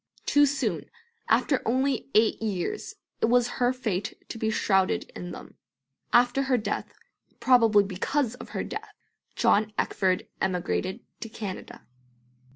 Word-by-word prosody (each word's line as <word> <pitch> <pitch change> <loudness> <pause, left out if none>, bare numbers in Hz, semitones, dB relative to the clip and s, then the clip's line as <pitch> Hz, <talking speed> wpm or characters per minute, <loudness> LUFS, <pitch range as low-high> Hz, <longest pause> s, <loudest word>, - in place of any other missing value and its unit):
Too 290 0 +5
soon, 275 0 -2 0.4
after 275 -4 +3
only 265 +4 0
eight 220 +1 +4
years, 215 - -3 0.3
it - - +4
was 245 0 +4
her 245 0 +4
fate 220 -6 -3
to 225 - -6
be 220 - 0
shrouded 190 -3 +2
in 175 - -6
them. - - -9 0.6
After 245 +2 +4
her 265 -2 +2
death 210 -2 -3 0.5
probably 230 -5 +5
because 220 +7 -1
of 250 - -10
her - - -3
death - - -7 0.4
John 215 +1 +3
Eckford 185 -2 0
emigrated 185 +3 -1 0.2
to 225 - -6
Canada. 205 -4 -7
225 Hz, 135 wpm, -27 LUFS, 200-250 Hz, 0.6 s, Too